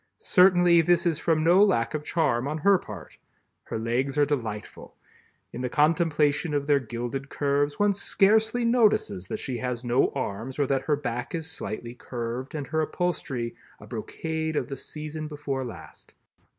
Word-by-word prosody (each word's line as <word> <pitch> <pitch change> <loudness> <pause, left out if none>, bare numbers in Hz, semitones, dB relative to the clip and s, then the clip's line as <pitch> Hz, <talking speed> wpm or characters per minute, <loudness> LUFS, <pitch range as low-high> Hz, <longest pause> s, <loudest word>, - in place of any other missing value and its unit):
Certainly 180 - +5
this 175 +2 +2
is 165 -3 +1
from 160 -2 +1
no 180 +5 +6
lack 160 - +2
of 150 -1 -3
charm 140 -7 0
on 150 +2 -2
her 195 +4 +4
part. 100 -6 -10 0.5
Her - - -4
legs 125 +5 -1
are 145 - +5
delightful. 115 -8 -5 0.6
In 125 - -5
the 125 - -2
contemplation 150 0 +2
of 140 -1 0
their 145 -1 +4
gilded 120 +3 -5
curves, 145 0 0
one 205 0 +3
scarcely 220 +4 +2
notices 215 - +2
that - - -3
she 125 -3 -4
has 125 -1 -3
no 120 +2 +2
arms 125 0 -4
or 145 - +2
that 135 0 -1
her 150 - +2
back 125 +1 -4
is 165 -1 -4
slightly 115 -4 -6
curved, 125 +2 -5
and 145 -2 -3
her 160 +4 -1
upholstery, 145 -8 -2 0.3
a - - -12
brocade 160 -1 -4
of - - -1
the 135 - -4
season 155 +2 -6
before 145 -3 -4
last. 120 - -11
145 Hz, 170 wpm, -26 LUFS, 125-165 Hz, 0.6 s, no